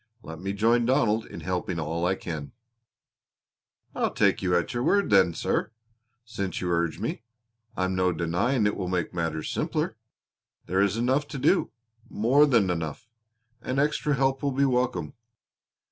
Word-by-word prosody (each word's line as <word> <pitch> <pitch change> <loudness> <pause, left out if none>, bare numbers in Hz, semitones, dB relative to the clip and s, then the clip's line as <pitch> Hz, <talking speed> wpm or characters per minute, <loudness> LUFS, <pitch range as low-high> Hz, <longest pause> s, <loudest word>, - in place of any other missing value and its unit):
Let 80 0 -8
me 95 +2 -3
join 115 +3 +2
Donald 115 -4 +2
in - - -9
helping 90 -1 -2
all 85 +2 -1
I 95 - +1
can." 75 -7 -6 1.4
"I'll - - 0
take - - +2
you 90 -2 +1
at 85 - -2
your 120 - -1
word 200 - +2
then, 95 -4 +5
sir, - - -1 0.5
since 100 -6 -4
you 90 -1 -2
urge 85 -1 0
me. - - -3 0.6
I'm 95 0 0
no 90 -1 +2
denying 90 +9 0
it 105 - +1
will 95 - -3
make 90 -2 -2
matters 80 -2 -2
simpler. - - -1 0.7
There 95 +2 +1
is 100 +2 +1
enough 130 +5 +1
to - - -6
do 150 +8 +2 0.4
more 130 +8 +4
than 115 -9 +3
enough, 85 +7 -5 0.5
and 130 - -3
extra 150 0 +1
help 135 0 +1
will 140 - 0
be 140 +2 +2
welcome. 125 - 0
100 Hz, 160 wpm, -26 LUFS, 90-125 Hz, 1.4 s, then